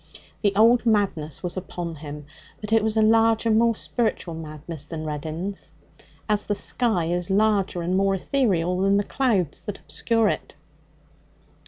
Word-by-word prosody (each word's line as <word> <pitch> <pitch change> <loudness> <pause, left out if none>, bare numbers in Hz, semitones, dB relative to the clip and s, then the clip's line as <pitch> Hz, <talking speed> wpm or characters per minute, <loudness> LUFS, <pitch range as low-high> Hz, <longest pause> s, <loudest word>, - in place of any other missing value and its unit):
The 200 -2 +1
old 230 +3 +5
madness 195 - 0
was 180 0 -3
upon 175 -2 -5
him, 150 -1 -8 0.3
but 210 +1 -4
it 225 -1 +4
was 220 0 0
a 220 - +5
larger, 225 +1 +3
more 230 +1 +3
spiritual 220 -7 -2
madness 155 -1 -7
than 155 -2 -5
Reddin's, 160 +6 -5 0.6
as 210 -1 +1
the 205 - -1
sky 220 -6 0
is 175 +2 -2
larger 195 -3 +1
and 180 +2 0
more 195 0 +2
ethereal 185 -6 0
than 195 +1 +3
the 205 - +2
clouds 205 - 0
that 205 - -6
obscure 225 -2 0
it. - - -4
195 Hz, 155 wpm, -24 LUFS, 170-220 Hz, 0.6 s, old